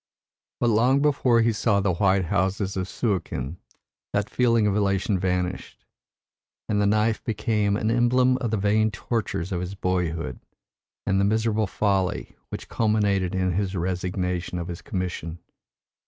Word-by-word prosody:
But 120 -1 +2
long 125 +5 +4
before 135 -5 +3
he 115 0 +2
saw 105 -1 +2
the 100 -2 +1
white 95 0 +2
houses 95 +1 0
of 95 -1 -2
Suakin 90 - -2 0.6
that 100 +1 -1
feeling 115 -3 +3
of 100 -1 +1
elation 100 -1 +1
vanished, 90 0 -2 0.8
and 105 -1 +1
the 100 - +3
knife 110 +2 +1
became 105 -2 0
an 110 +1 0
emblem 125 +2 +3
of 125 -3 -2
the 110 - 0
vain 105 +2 +2
tortures 100 -3 -3
of 90 -2 -1
his 90 +2 -5
boyhood 85 -8 -2 0.7
and 95 0 +2
the - - +3
miserable 110 +1 +1
folly 95 - -1
which - - -7
culminated 100 -4 +1
in 95 -1 +1
his 95 +1 -1
resignation 90 0 -2
of 85 0 -4
his 85 +2 -6
commission. 90 -3 -4
100 Hz, 150 wpm, -25 LUFS, 90-110 Hz, 0.8 s, long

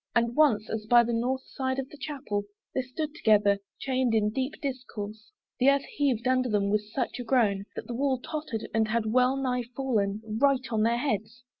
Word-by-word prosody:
And 235 0 +2
once, 225 -9 +4
as 215 -1 -4
by 240 +1 +7
the 235 0 -2
north 255 +3 0
side 260 -1 -3
of 270 -1 -2
the 295 - -12
Chapel 260 -9 -3 0.3
They 260 - +1
stood 290 +4 -4
together, 210 -9 +3 0.2
chained 255 -3 +1
in 210 -1 +2
deep 265 +5 -2
discourse, 230 -6 -6 0.3
The 260 +2 +6
earth 280 0 +3
heaved 260 -5 +1
under 255 -1 +2
them 200 -2 +1
with 210 0 0
such 250 0 -2
a - - -3
groan, 220 -5 +2
That - - -5
the 240 - -5
wall 265 +2 +1
tottered, 260 -4 -5
and 220 -1 +2
had 225 0 0
well 250 +4 +3
nigh 250 -2 -1
fallen 215 -6 0
Right 260 +4 +2
on 215 - +2
their 230 +2 +3
heads. 235 -2 -2
240 Hz, 200 wpm, -28 LUFS, 215-265 Hz, 0.3 s, by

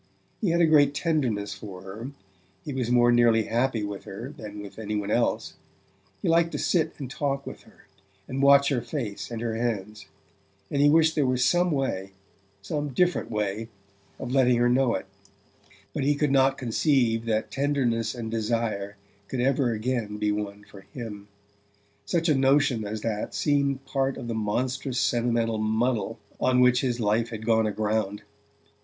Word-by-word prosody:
He 205 - +1
had 170 +1 +2
a - - +6
great 145 -3 +4
tenderness 130 -12 0
for 95 -3 -9
her, 105 +7 -7 0.6
he 145 - -4
was 125 -3 -2
more 120 0 +5
nearly 120 -2 +4
happy 120 0 0
with 100 -1 -5
her 120 +9 -7
than 105 -5 -8
with 100 +2 -11
any 105 -1 -3
one 105 0 -2
else; 115 -1 0 0.7
he - - 0
liked 165 0 +3
to - - -1
sit 170 -4 +1
and 140 - -5
talk 140 +1 -2
with - - -8
her, - - -21 0.4
and 135 +1 -3
watch 140 0 +6
her 130 -4 0
face 110 -6 -5
and 115 -2 -5
her 115 -1 -1
hands, 105 -3 -3 0.6
and 140 - +1
he 145 - +6
wished 160 +1 +4
there 145 -4 +1
were 130 0 +1
some 175 +7 +3
way 130 - -2 0.5
some 145 +7 -2
different 175 +7 +1
way 105 0 -2 0.5
of 125 - -6
letting 125 -2 +4
her 120 0 +3
know 125 -1 +3
it; - - -4 0.9
but - - -2
he 145 +2 +2
could 145 -1 +1
not 135 0 +3
conceive 120 -2 +1
that 110 -1 -1
tenderness 130 -6 0
and 115 -2 -5
desire 110 -3 -2 0.3
could 130 - -4
ever 130 0 +2
again 110 -2 -2
be 105 0 0
one 105 0 -4
for 105 -1 -14
him: 105 -5 -8 0.8
such 170 -1 0
a 155 - +4
notion 135 -4 +3
as 110 +1 -4
that 105 -2 -3
seemed 140 -2 +1
part 135 -1 -1
of 120 - -6
the 115 - -2
monstrous 125 +4 -1
sentimental 115 -2 +1
muddle 110 +2 0 0.2
on 130 0 +3
which 125 0 +5
his 125 -2 -1
life 110 +2 +1
had 110 -2 -7
gone 110 -1 +3
aground. 105 -1 -1
120 Hz, 175 wpm, -26 LUFS, 110-135 Hz, 0.9 s, a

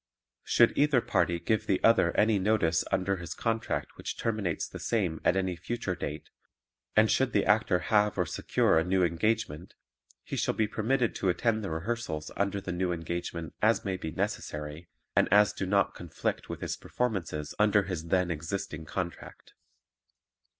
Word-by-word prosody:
Should 120 - +4
either 145 -3 +4
party 85 -6 +1
give 110 +5 0
the 95 - +2
other 115 -7 +5
any 105 -1 +4
notice 95 -5 +2
under 95 0 +1
his 85 -1 -6
contract 115 +1 -2
which - - -5
terminates 105 -7 -1
the - - -9
same 90 -9 -1
at - - +3
any 95 -2 0
future 95 +3 -3
date 75 -3 -6 0.6
and 110 0 +5
should 130 -2 +2
the 100 - +2
Actor 105 -2 +3 0.2
have 105 -1 +3
or 90 - +2
secure 80 - +2
a - - +1
new 90 +1 +2
engagement 90 -1 -1 0.5
he - - -5
shall - - 0
be 110 - +1
permitted 115 +3 0
to 95 - 0
attend 110 +4 +1
the 95 - -3
rehearsals 80 -2 -3
under 100 0 0
the 95 - -5
new 90 0 -1
engagement 85 0 -4
as 110 +1 +3
may 95 -1 -1
be 90 -3 -5
necessary 75 +1 -4 0.3
and - - +3
as 105 +1 +5
do 95 -2 -3
not 100 0 +2
conflict 85 -3 -4
with - - -6
his - - -2
performances 95 -11 -3
under 105 -1 +4
his 90 -4 -4
then 90 0 +2
existing 80 0 -4
contract. 85 +2 -6
95 Hz, 170 wpm, -29 LUFS, 85-110 Hz, 0.6 s, other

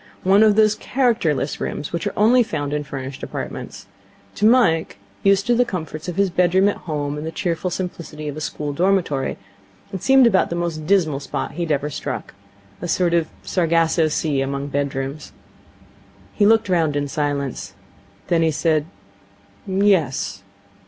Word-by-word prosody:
One 195 +3 +5
of 215 -2 +5
those 215 -1 +5
characterless 215 - 0
rooms 145 - -4
which 170 0 -2
are - - -3
only 235 +5 +5
found 145 -10 -2
in 150 0 -1
furnished 135 -1 -7
apartments. - - -6 0.5
To 210 - +2
Mike, 175 - +3 0.2
used 195 0 +3
to 240 - +3
the 245 +1 +4
comforts 165 -6 -6
of 175 - -4
his 195 -1 +1
bedroom 180 +2 +3
at - - -3
home 145 -1 -2
and 155 - -5
the - - -3
cheerful 175 +1 -2
simplicity 165 -4 -5
of 145 - -4
a 155 - -6
school 150 -1 -4
dormitory, 175 -5 0 0.6
it 190 - -4
seemed 265 -1 +5
about 200 -5 +3
the 170 - -3
most 165 -3 -3
dismal 170 -8 +2
spot 140 - -4
he 175 - -6
had 165 -2 -1
ever 145 +1 0
struck. - - -5 0.5
A 175 - -3
sort 175 0 +1
of 170 -2 +2 0.2
Sargasso 165 -2 +2
Sea 150 -2 0
among 140 +1 -3
bedrooms. 140 +1 -3 1.0
He 205 - +3
looked 225 0 +4
round 165 -5 +1
in 145 0 -1
silence. 140 -3 -3 0.5
Then 170 -1 +1
he 165 - +3
said: 155 0 +1 0.8
'Yes.' 170 - +1
165 Hz, 165 wpm, -21 LUFS, 145-195 Hz, 1.0 s, One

